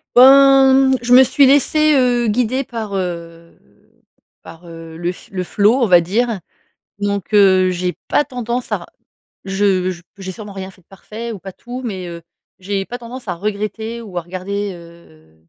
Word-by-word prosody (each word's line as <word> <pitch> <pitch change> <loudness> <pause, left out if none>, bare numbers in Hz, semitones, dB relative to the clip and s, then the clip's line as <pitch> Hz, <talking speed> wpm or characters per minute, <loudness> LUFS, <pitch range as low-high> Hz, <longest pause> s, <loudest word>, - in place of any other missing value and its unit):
Ben, 270 +1 +7 0.2
mmh, - - +3
je 245 0 +1
me 260 +1 +9
suis 270 +2 +3
laissée, 300 +3 +3
heu, 245 -3 +2
guider 250 +4 0
par, 225 -5 -6
heu, 170 -2 -6 0.8
par, 165 +2 -14
heu, 165 -1 -11
le 175 +1 -2
f - - -15
le 185 -1 -3
flow, 205 +5 +2
on - - +4
va 175 -2 +6
dire, 220 +5 -1 0.6
donc, 200 -1 -3
heu, 190 -2 +5
j'ai 180 0 -3
pas 295 - +2
tendance 245 -1 -5
à - - +1
r - - -11 0.6
je 195 -1 0
j 170 - -10 0.2
j'ai 190 -1 -6
sûrement 205 +1 -10
rien 190 0 -7
fait 190 - -22
de - - -39
parfait 220 +4 -8
ou 205 - -9
pas 190 +1 -9
tout, 245 +6 -9
mais, 190 -6 -5
heu, 170 0 -8 0.4
j'ai 195 +1 -3
pas 245 - -7
tendance 245 0 -10
à 180 - -2
regretter 215 +4 -4
ou 195 -6 -9
à - - -1
regarder, 190 +4 -5
heu, 170 - -17
200 Hz, 185 wpm, -18 LUFS, 180-240 Hz, 0.8 s, me